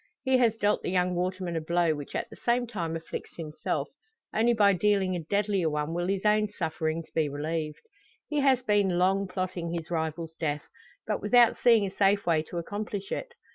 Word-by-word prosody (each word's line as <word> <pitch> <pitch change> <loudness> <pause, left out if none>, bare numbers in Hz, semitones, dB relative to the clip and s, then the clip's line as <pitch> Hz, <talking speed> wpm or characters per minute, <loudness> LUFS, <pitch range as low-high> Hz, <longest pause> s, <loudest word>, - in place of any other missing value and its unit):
He 260 -1 +3
has 230 -3 +3
dealt 205 -1 +1
the - - -3
young 180 0 +1
waterman 180 0 -2
a 165 - -1
blow 170 0 +2
which 145 -2 -7
at - - -2
the - - -9
same 245 +1 +1
time 175 -8 -3
afflicts 165 0 -7
himself; 155 -2 -3 0.5
only 230 +2 +3
by 205 -2 +5
dealing 190 0 +2
a - - -2
deadlier 195 0 0
one 150 +1 -2
will 175 +1 -1
his 195 +1 -1
own 210 0 +4
sufferings 160 -3 -3
be 155 -2 +1
relieved. 150 +2 -3 0.4
He 300 -1 -1
has 265 -2 +3
been 205 -5 +2
long 190 +2 +2
plotting 180 -2 -3
his 165 0 -6
rival's 160 0 -2
death, 150 -2 -2 0.4
but 210 - -2
without 235 +2 +5
seeing 230 -4 +4
a 190 - -4
safe 200 +1 +2
way 165 -3 +3
to 175 - -5
accomplish 205 +2 -4
it. 475 -1 -4
185 Hz, 195 wpm, -28 LUFS, 165-210 Hz, 0.5 s, by